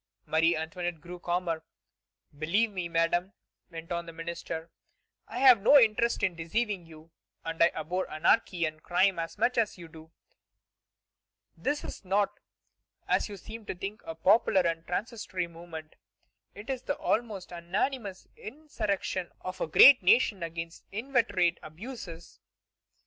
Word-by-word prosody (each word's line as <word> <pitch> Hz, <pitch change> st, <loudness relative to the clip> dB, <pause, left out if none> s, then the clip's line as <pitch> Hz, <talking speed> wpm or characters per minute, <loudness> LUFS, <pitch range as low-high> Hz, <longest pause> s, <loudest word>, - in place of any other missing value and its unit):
Marie 165 Hz, +2 st, +3 dB
Antoinette 165 Hz, +1 st, -4 dB
grew 175 Hz, +2 st, -9 dB
calmer. 175 Hz, -2 st, -2 dB, 0.7 s
"Believe 190 Hz, +10 st, +1 dB
me, 180 Hz, -3 st, -4 dB
Madame," 170 Hz, +3 st, +1 dB, 0.4 s
went 165 Hz, -1 st, -9 dB
on 170 Hz, 0 st, -2 dB
the -, -, -7 dB
minister; 165 Hz, 0 st, -6 dB, 0.6 s
"I -, -, -7 dB
have 255 Hz, -5 st, +7 dB
no 285 Hz, +8 st, +7 dB
interest 235 Hz, -2 st, +3 dB
in 185 Hz, -4 st, +1 dB
deceiving 185 Hz, +2 st, -2 dB
you, 160 Hz, 0 st, -15 dB, 0.3 s
and 165 Hz, 0 st, -4 dB
I 170 Hz, -, +8 dB
abhor 175 Hz, +4 st, -3 dB
anarchy 170 Hz, +2 st, +2 dB
and 155 Hz, 0 st, -5 dB
crime 185 Hz, +1 st, +2 dB
as 165 Hz, +3 st, -4 dB
much 240 Hz, +3 st, +2 dB
as 215 Hz, -4 st, 0 dB
you 170 Hz, -1 st, -10 dB
do.... 160 Hz, 0 st, -14 dB, 1.4 s
This 285 Hz, -, -2 dB
is -, -, -8 dB
not, 200 Hz, +2 st, 0 dB, 0.7 s
as -, -, +1 dB
you 200 Hz, -, -7 dB
seem 220 Hz, +3 st, -10 dB
to -, -, -3 dB
think, 195 Hz, +4 st, -6 dB
a 165 Hz, -, -6 dB
popular 190 Hz, +3 st, +4 dB
and 165 Hz, -1 st, -2 dB
transitory 190 Hz, -2 st, -3 dB
movement. 165 Hz, -2 st, -10 dB, 0.6 s
It 215 Hz, +6 st, -6 dB
is 260 Hz, -2 st, -3 dB
the 285 Hz, -, -3 dB
almost 215 Hz, -6 st, -2 dB
unanimous 190 Hz, +4 st, -3 dB
insurrection 215 Hz, -, -3 dB
of 185 Hz, 0 st, -6 dB
a -, -, 0 dB
great 255 Hz, -, +9 dB
nation 195 Hz, 0 st, +4 dB
against 165 Hz, 0 st, -6 dB
inveterate 205 Hz, -7 st, +1 dB
abuses. 170 Hz, -1 st, -9 dB
180 Hz, 145 wpm, -29 LUFS, 165-210 Hz, 1.4 s, great